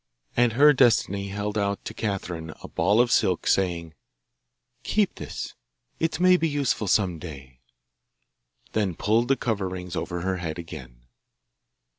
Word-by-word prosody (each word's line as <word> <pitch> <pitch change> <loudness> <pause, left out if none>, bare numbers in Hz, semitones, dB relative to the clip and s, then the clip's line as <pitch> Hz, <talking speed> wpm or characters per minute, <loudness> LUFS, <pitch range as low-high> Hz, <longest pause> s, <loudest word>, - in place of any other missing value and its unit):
And 120 -1 +3
her 145 +5 +7
Destiny 110 -6 +3
held 105 +2 -3
out 100 0 -2
to - - -5
Catherine 90 -6 -4
a - - -6
ball 105 +3 +2
of 120 -1 +4
silk, 95 -8 +2
saying, 85 -4 0 0.9
'Keep 210 - +1
this - - -6 0.5
it 160 -1 -1
may 185 0 +6
be 165 -1 0
useful 140 -7 0
some 90 -4 +2
day;' 65 -7 -10 1.1
then 100 -5 0
pulled 110 +6 +2
the 135 +1 +2
coverings 95 -5 -3
over 90 0 -3
her 95 +1 -1
head 80 -2 -4
again. - - -10
100 Hz, 140 wpm, -25 LUFS, 85-120 Hz, 1.1 s, her